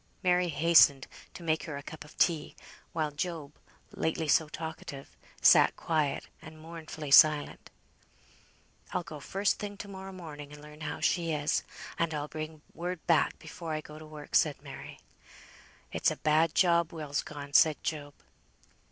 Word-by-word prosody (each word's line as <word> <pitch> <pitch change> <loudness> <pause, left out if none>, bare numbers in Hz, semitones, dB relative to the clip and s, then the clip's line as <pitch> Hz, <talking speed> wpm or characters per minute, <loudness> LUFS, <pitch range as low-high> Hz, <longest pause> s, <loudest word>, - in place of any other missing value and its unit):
Mary 180 -1 +3
hastened 145 -3 +5 0.3
to 175 - -11
make 160 -1 0
her 150 -3 -5
a 140 - -8
cup 155 +2 -9
of 150 - -17
tea; 160 -4 +1 0.4
while 155 -2 -1
Job, 150 -1 -4 0.4
lately 160 0 -1
so 155 +1 +3
talkative, 155 -3 -7 0.3
sat - - +7
quiet 155 -4 -1
and 155 0 -12
mournfully 155 -2 -8
silent. 150 +1 +5 1.2
"I'll 180 - -1
go 155 -3 -9
first 195 +8 0
thing 205 -1 -6
to 205 - -7
morrow 190 -1 -8
morning, 150 -6 -9
and 150 - -11
learn 150 +1 -13
how 155 - -4
she 170 -2 +1
is; 150 0 +1 0.4
and 165 -2 0
I'll 145 0 -3
bring 155 0 -7
word 175 0 -5
back 165 -3 +3
before 165 -2 -7
I 155 - -2
go 150 0 -11
to 155 - -11
work," 150 -1 -11
said 150 -4 +3
Mary. 140 -2 -10 0.9
"It's - - +2
a - - -3
bad 155 +1 +2
job 170 -2 +3
Will's 150 -3 -3
gone," 145 -1 -9
said 155 +1 +5
Job. 145 -2 -4
155 Hz, 160 wpm, -30 LUFS, 150-170 Hz, 1.2 s, sat